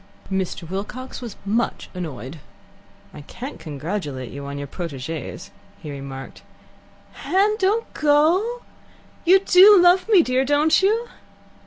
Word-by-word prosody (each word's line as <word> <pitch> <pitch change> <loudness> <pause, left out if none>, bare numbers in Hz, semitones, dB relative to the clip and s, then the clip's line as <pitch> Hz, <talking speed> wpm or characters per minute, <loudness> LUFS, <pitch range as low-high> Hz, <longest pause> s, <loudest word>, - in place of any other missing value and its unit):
Mr. 190 -2 -3
Wilcox 210 +10 -6
was 235 -5 -7
much 225 +4 -1
annoyed. 155 -5 -7 0.7
"I - - -10
can't 255 - -9
congratulate 150 - -5
you 140 0 -7
on 140 0 -6
your 145 - -5
proteges," 155 -1 -7 0.3
he 150 - -8
remarked. 135 -1 -8 0.7
"Hen, 405 +3 +1
don't 420 +4 0
go. 335 +11 +2 0.6
You 375 +2 +6
do 395 +2 +7
love 355 +4 +4
me, 390 -6 +6
dear, 255 0 +1
don't 290 +5 +3
you?" 445 +5 +1
240 Hz, 125 wpm, -22 LUFS, -, 0.7 s, do